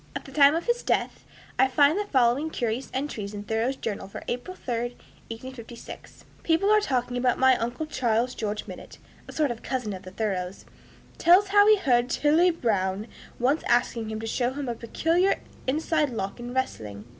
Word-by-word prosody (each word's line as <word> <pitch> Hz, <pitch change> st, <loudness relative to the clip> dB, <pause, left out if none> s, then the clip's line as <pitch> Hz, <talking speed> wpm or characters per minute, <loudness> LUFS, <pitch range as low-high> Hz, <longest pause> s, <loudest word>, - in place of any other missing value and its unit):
At -, -, -5 dB
the -, -, -11 dB
time 285 Hz, 0 st, +6 dB
of 335 Hz, -, -2 dB
his 480 Hz, 0 st, +1 dB
death, -, -, -1 dB, 0.3 s
I 265 Hz, -, +6 dB
find 285 Hz, +4 st, +4 dB
the 415 Hz, +1 st, -1 dB
following 265 Hz, -1 st, +2 dB
curious 240 Hz, -2 st, -2 dB
entries, 220 Hz, -7 st, -4 dB
in 205 Hz, -, -6 dB
Thoreau's 225 Hz, +5 st, -1 dB
journal 210 Hz, -6 st, -5 dB
for 195 Hz, -, -9 dB
April 250 Hz, +10 st, -4 dB
3, 240 Hz, 0 st, -3 dB, 0.3 s
1856: 235 Hz, 0 st, -10 dB, 0.2 s
"People 345 Hz, +5 st, +2 dB
are 430 Hz, -, +6 dB
talking 250 Hz, -8 st, -1 dB
about 250 Hz, 0 st, +1 dB
my 260 Hz, 0 st, +5 dB
uncle 240 Hz, +7 st, -3 dB
Charles. 245 Hz, -4 st, 0 dB
George 210 Hz, -2 st, -3 dB
Minott -, -, -10 dB, 0.3 s
[a -, -, -8 dB
sort 300 Hz, -4 st, 0 dB
of 235 Hz, -, -7 dB
cousin 250 Hz, -6 st, -3 dB
of 185 Hz, -, -7 dB
the 185 Hz, -, -10 dB
Thoreaus] 190 Hz, -2 st, -3 dB, 0.5 s
tells 370 Hz, +4 st, +5 dB
how 410 Hz, +1 st, +6 dB
he 430 Hz, 0 st, +7 dB
heard 250 Hz, -9 st, +2 dB
Tilly 315 Hz, +7 st, +3 dB
Brown 205 Hz, -, -1 dB, 0.3 s
once 270 Hz, +6 st, +2 dB
asking 235 Hz, -2 st, +1 dB
him 220 Hz, 0 st, -4 dB
to 225 Hz, -, -5 dB
show 245 Hz, +2 st, 0 dB
him 285 Hz, -1 st, -4 dB
a 240 Hz, -, -1 dB
peculiar 330 Hz, -, +1 dB, 0.3 s
inside 305 Hz, +2 st, +1 dB
lock 200 Hz, -3 st, -4 dB
in 240 Hz, 0 st, -6 dB
wrestling. 110 Hz, -, -3 dB
250 Hz, 185 wpm, -26 LUFS, 225-300 Hz, 0.5 s, he